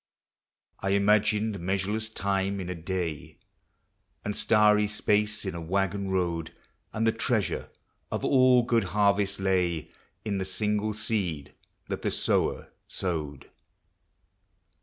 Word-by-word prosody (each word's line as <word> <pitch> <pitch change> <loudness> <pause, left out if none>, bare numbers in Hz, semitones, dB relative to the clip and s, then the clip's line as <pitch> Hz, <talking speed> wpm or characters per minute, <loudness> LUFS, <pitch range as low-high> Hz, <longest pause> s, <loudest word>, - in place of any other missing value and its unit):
I 95 - -2
imagined 105 +1 +2
measureless 100 +5 -1
time 100 -1 -1
in 90 -1 -5
a - - -1
day, 85 -3 -4 0.9
And 105 -1 -2
starry 105 -1 +4
space 105 0 0
in 95 - -2
a 85 - -5
waggon 95 +3 -1
road, 85 -3 -1 0.4
And 110 +1 -1
the 115 - +4
treasure - - -1 0.4
of - - -2
all 130 -2 +5
good 115 -3 +2
harvests 100 -1 +2
lay 90 -4 0 0.3
In 100 -2 -1
the - - -1
single 105 +3 -1
seed 95 -9 -2 0.3
that - - -4
the - - 0
sower - - 0
sowed. 75 -6 -4
100 Hz, 120 wpm, -28 LUFS, 90-105 Hz, 0.9 s, all